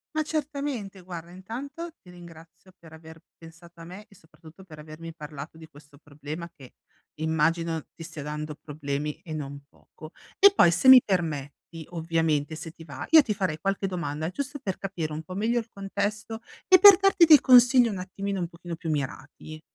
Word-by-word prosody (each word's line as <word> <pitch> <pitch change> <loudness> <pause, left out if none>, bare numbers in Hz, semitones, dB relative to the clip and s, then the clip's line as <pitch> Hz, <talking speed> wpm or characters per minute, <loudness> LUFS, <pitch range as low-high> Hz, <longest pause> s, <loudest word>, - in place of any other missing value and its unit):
Ma 310 - +1
certamente 280 -10 -4
guarda, 175 -1 -9
intanto 275 - -8
ti 180 - -18
ringrazio 170 +1 -15
per 165 -2 -17
aver 160 0 -14 0.2
pensato 170 +1 -16
a 165 - -10
me, 190 +5 -11
e 200 - -20
soprattutto 165 +2 -18
per 155 -4 -13
avermi 160 +2 -10
parlato 150 0 -9
di 160 -1 -13
questo 145 0 -18
problema 155 +3 -9
che 130 -3 -15 0.5
immagino 160 +1 0
ti 165 - -10
stia 160 -2 -8
dando 150 +1 -5
problemi, 150 0 -5
e 160 - -10
non 140 -2 -7
poco. 155 0 -15 0.3
E 400 0 +8
poi 175 - +5
se 175 +10 +3
mi 260 -1 +11
permetti, 160 -3 -4
ovviamente 160 -3 -1
se 155 +1 -8
ti 165 - -14
va, 140 -4 -8
io 320 -1 +8
ti 225 -6 -2
farei 185 -6 -2
qualche 195 +3 -2
domanda, 160 -4 -4
giusto 280 +5 -5
per 195 -8 -4
capire 170 -6 -5
un 155 +1 -6
po' 185 - -10
meglio 225 +5 0
il 230 - -8
contesto, 205 +3 -4 0.3
e 375 -1 +8
per 395 +1 +9
darti 390 -2 +3
dei 310 -3 +8
consigli 250 -1 +6
un 205 - -4
attimino 195 +1 -4
un 170 - -3
pochino 170 -1 -8
più 165 0 -7
mirati. 145 +2 -5
170 Hz, 185 wpm, -26 LUFS, 155-205 Hz, 0.5 s, mi